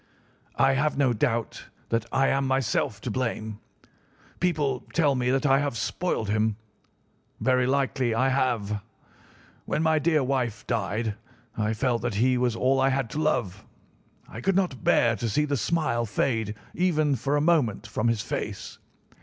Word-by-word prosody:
I 135 0 +4
have 150 +2 0
no 135 -3 +3
doubt 115 +1 -1 0.2
that 115 -1 0
I 135 0 +3
am 135 0 +1
myself 130 -5 0
to - - -4
blame. 110 -4 -3 0.8
People 150 -8 0
tell 150 -4 +3
me 125 -1 0
that 135 +2 +1
I 135 -1 +5
have 140 -4 -2
spoiled 175 - -2
him. 110 +1 +1 0.8
Very 130 -1 +2
likely 130 -3 +1
I 130 +3 +2
have. 115 -6 0 0.8
When 155 - -1
my 160 -1 +3
dear 155 -1 +2
wife 125 -4 -1
died 110 -1 -1 0.4
I 110 0 0
felt 120 +1 0
that 105 - -2
he 125 +5 +3
was 125 -2 +1
all 130 +3 +2
I 135 - +4
had 135 -3 -1
to 150 - -2
love. 120 - -1 0.6
I 110 - -8
could 195 +7 +1
not 175 - 0
bear 115 -1 +3
to 115 - -2
see 150 +8 +1
the 145 -1 -1
smile 120 -3 0
fade 110 -1 -1 0.2
even 155 -5 +2
for 135 +4 -1
a - - +3
moment 145 -10 +2
from 115 +2 -1
his 115 -2 +1
face. - - -5
130 Hz, 165 wpm, -26 LUFS, 115-140 Hz, 0.8 s, I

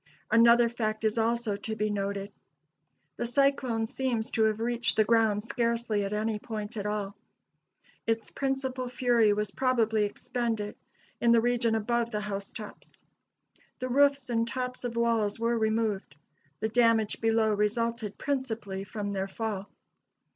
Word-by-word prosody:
Another 235 +1 +6
fact 220 -2 -2
is 220 +1 +1
also 230 -1 +1
to 220 +2 -4
be 215 -1 -1
noted. 200 0 -3 0.9
The - - -2
cyclone 255 -3 +2
seems 245 -2 -2
to 220 -2 +3
have 215 0 +1
reached 235 +1 +1
the 215 - +5
ground 220 -2 +2
scarcely 230 -2 0
at 195 - -3
any 215 0 -1
point 215 -1 -5
at 205 -1 -3
all. 205 -1 -3 0.9
Its 225 -1 -1
principal 265 -2 -2
fury 240 -3 +3
was 210 -1 -1
probably 225 -4 +2
expended 220 0 -3 0.4
in 235 -1 +4
the 230 - +6
region 235 -1 +1
above 235 +2 0
the 210 -2 -2
housetops. 205 +1 -7 0.7
The 255 -1 -4
roofs 275 -1 +3
and 230 0 +1
tops 250 +1 -4
of 235 -1 -3
walls 230 -3 +1
were 230 +1 +1
removed; 220 -7 0 0.5
the 220 - 0
damage 230 -2 +2
below 225 -1 +3
resulted 215 +1 -1
principally 230 -9 -3
from 205 +1 -4
their 195 0 -2
fall. 205 -1 -4
225 Hz, 145 wpm, -29 LUFS, 210-235 Hz, 0.9 s, Another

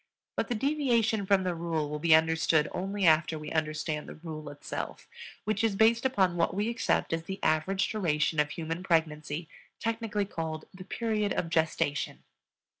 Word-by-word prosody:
But - - 0
the 245 - -1
deviation 235 -6 +1
from 195 -1 +4
the 180 -1 0
rule 165 -2 -2
will 150 +1 -4
be 160 0 +6
understood 160 -1 +3
only 195 +1 -2
after 160 0 +4
we 150 - -7
understand 155 -1 -2
the - - -8
rule 155 -2 -7
itself, 145 0 -6 0.4
which 215 +1 0
is 220 -3 +2
based 230 +4 +4
upon 190 -8 +1
what 170 +1 +1
we 205 +3 0
accept 235 - 0
as 165 0 -2
the 190 +2 -5
average 185 +5 +2
duration 160 -6 +1
of 150 0 +3
human 165 +2 -4
pregnancy, 160 -2 0 0.3
technically 225 -3 -1
called 160 -4 -4
the 185 0 -10
period 215 -1 -1
of 165 - -2
gestation. 160 -3 0
170 Hz, 170 wpm, -29 LUFS, 155-205 Hz, 0.4 s, be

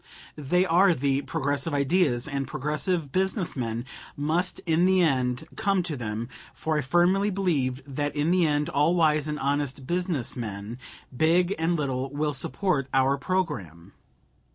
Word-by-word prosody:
They 165 +5 +1
are 180 +1 +4
the 140 +1 +1
progressive 145 +2 -1
ideas, 140 -4 +2
and 140 -2 -3
progressive 150 +3 -2
business 190 - 0
men 120 -2 -3 0.3
must 160 +6 0
in 165 +1 +3
the 190 0 +4
end 130 -1 0
come 195 -2 +1
to 165 -3 -3
them, 115 -2 -4 0.3
for 160 -1 -1
I - - +1
firmly 175 +8 +2
believe 145 -10 -1
that 145 +1 -3
in 150 +3 +1
the 180 -2 +3
end 150 0 0
all 165 +1 +2
wise 155 -3 +3
and 150 0 -2
honest 140 -1 -1
business 175 -6 -1
men, 110 0 -6 0.4
big 175 +6 +3
and 165 +2 +1
little, 135 -3 -2
will 150 +2 -1
support 150 -1 0
our 135 +1 +4
programme. 100 - -3
150 Hz, 155 wpm, -26 LUFS, 135-175 Hz, 0.4 s, are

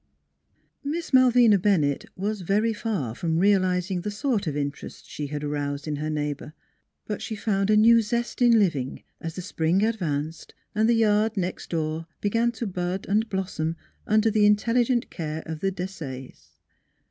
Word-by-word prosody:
Miss 315 +2 -4
Malvina 245 -5 +6
Bennett 165 -8 +1
was 205 +2 -2
very 210 +5 +1
far 200 - -2
from 160 +5 -1
real 200 +2 +5
izing 180 0 -1
the 210 - -3
sort 210 - -1
of 145 -1 -2
interest 140 -1 -5
she 150 - -5
had 150 +1 -5
aroused 145 0 -3
in 150 -1 -2
her 155 +1 -3
neighbor. 150 -1 -3 0.5
But 210 - -4
she 220 - -4
found 200 -1 0
a 215 - +5
new 230 +2 +6
zest 235 +3 -3
in 240 -2 +6
living 150 -11 0 0.2
as 165 0 -6
the 185 - -5
spring 170 +4 +1
advanced 160 -8 -3 0.2
and 220 +2 +2
the 235 - +4
yard 215 0 +2
next 180 -1 -3
door 160 0 -2
began 230 +3 +1
to 230 +1 -4
bud 180 -1 -3
and 215 +3 +1
blossom 180 -5 -2 0.3
under 215 +1 +3
the 210 -1 +4
intelligent 235 +4 +2
care 160 -2 -4
of 160 -1 -5
the 195 +3 0
Desayes. 165 -9 -7
195 Hz, 170 wpm, -25 LUFS, 160-220 Hz, 0.5 s, Malvina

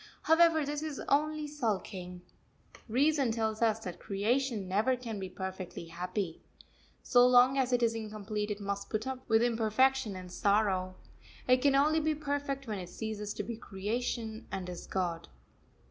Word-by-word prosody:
However, 320 -1 +5
this 290 +1 -3
is 310 -3 -4
only 305 +2 +2
sulking. 195 -10 -3 0.7
Reason 275 +1 +3
tells 220 -1 -1
us 220 -2 +3
that 180 -4 -6
creation 220 +1 0
never 215 +8 +2
can 230 -4 -6
be 190 -1 -5
perfectly 185 -2 -6
happy. 180 +1 -4 0.6
So 245 -1 +6
long 250 +1 +6
as 260 -2 +1
it 245 -1 +2
is 230 -1 +3
incomplete 215 -1 -4
it 210 0 -3
must 200 0 -4
put 215 0 -2
up 265 -1 -3
with 225 +1 +5
imperfection 235 0 +2
and 185 -1 -8
sorrow. 190 -2 +1 0.5
It 255 0 +6
can 275 +1 +3
only 305 +3 +4
be 310 0 +1
perfect 285 -2 -3
when 215 -4 -3
it 180 -1 -7
ceases 210 +1 -4
to - - -3
be 235 -2 -5
creation, 220 +2 -3
and 185 -2 -4
is 180 - -7
God. 175 -3 -2
225 Hz, 160 wpm, -31 LUFS, 195-265 Hz, 0.7 s, So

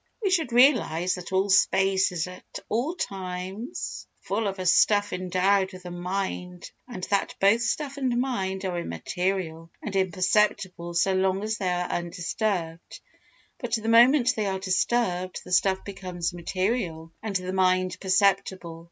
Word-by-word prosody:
We 390 - +1
should 325 -9 +1
realise 235 - +4
that 180 -1 -7
all 190 +1 +2
space 190 0 +3
is 170 -3 -2
at 180 0 -10
all 255 +10 -1
times 190 - -5
full 205 +2 -1
of 195 0 -3
a 185 - -4
stuff 205 +3 +4
endowed 185 +2 +1
with 185 -1 -11
a 175 - -6
mind 180 0 -4 0.2
and 190 -8 -8
that 200 - 0
both 205 +4 +4
stuff 275 +4 -2
and 255 -3 0
mind 195 -7 -2
are 180 -2 -2
immaterial 165 - -3
and 205 -3 -6
imperceptible 185 -1 +1
so 190 +3 +3
long 190 +1 +1
as 215 0 -2
they 185 - 0
are 180 0 -1
undisturbed, 175 0 -3 0.6
but 245 -2 -1
the 220 -1 -4
moment 245 +2 +6
they 215 -2 -1
are 190 -1 -1
disturbed 185 -1 0
the 180 - -10
stuff 190 +1 +2
becomes 180 -3 -4
material 175 -2 -2
and 215 -3 -4
the 185 0 -2
mind 185 -1 +2
perceptible. 190 -3 +1
190 Hz, 150 wpm, -26 LUFS, 180-210 Hz, 0.6 s, moment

